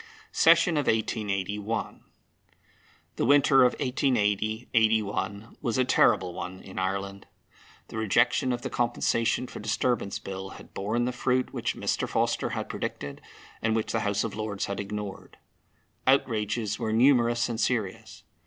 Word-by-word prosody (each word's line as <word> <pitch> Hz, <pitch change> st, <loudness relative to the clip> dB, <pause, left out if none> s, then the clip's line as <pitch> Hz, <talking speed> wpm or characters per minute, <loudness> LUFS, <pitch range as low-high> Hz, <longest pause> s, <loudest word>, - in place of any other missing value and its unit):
SESSION 165 Hz, 0 st, +5 dB
OF 145 Hz, -, 0 dB
1881. 105 Hz, -1 st, -1 dB, 1.1 s
The -, -, +1 dB
winter 140 Hz, 0 st, +5 dB
of 125 Hz, -, +4 dB
1880 110 Hz, -4 st, 0 dB
81 110 Hz, -1 st, 0 dB
was 120 Hz, -1 st, -1 dB
a 130 Hz, -, +3 dB
terrible 95 Hz, -8 st, +3 dB
one 95 Hz, +1 st, -6 dB
in 95 Hz, -, -7 dB
Ireland. 100 Hz, +1 st, -3 dB, 0.6 s
The -, -, -7 dB
rejection 110 Hz, +4 st, +2 dB
of 120 Hz, -1 st, -3 dB
the -, -, -4 dB
Compensation 120 Hz, 0 st, +1 dB
for -, -, -9 dB
Disturbance 105 Hz, -1 st, -1 dB
Bill 95 Hz, 0 st, -6 dB
had -, -, -15 dB
borne 110 Hz, +5 st, -1 dB
the 125 Hz, -, 0 dB
fruit 125 Hz, +1 st, 0 dB
which -, -, -2 dB
Mr. -, -, -1 dB
Forster -, -, 0 dB
had -, -, -4 dB
predicted, 70 Hz, 0 st, -5 dB, 0.4 s
and 110 Hz, 0 st, +1 dB
which 110 Hz, -, -1 dB
the -, -, 0 dB
House 105 Hz, 0 st, 0 dB
of 115 Hz, -, -4 dB
Lords 105 Hz, -2 st, -3 dB
had 100 Hz, -1 st, -4 dB
ignored. 100 Hz, -1 st, -6 dB, 0.7 s
Outrages 110 Hz, -5 st, +1 dB
were 110 Hz, -2 st, -1 dB
numerous 120 Hz, 0 st, +4 dB
and 115 Hz, -1 st, -3 dB
serious. 110 Hz, -5 st, -2 dB
110 Hz, 145 wpm, -27 LUFS, 100-120 Hz, 1.1 s, SESSION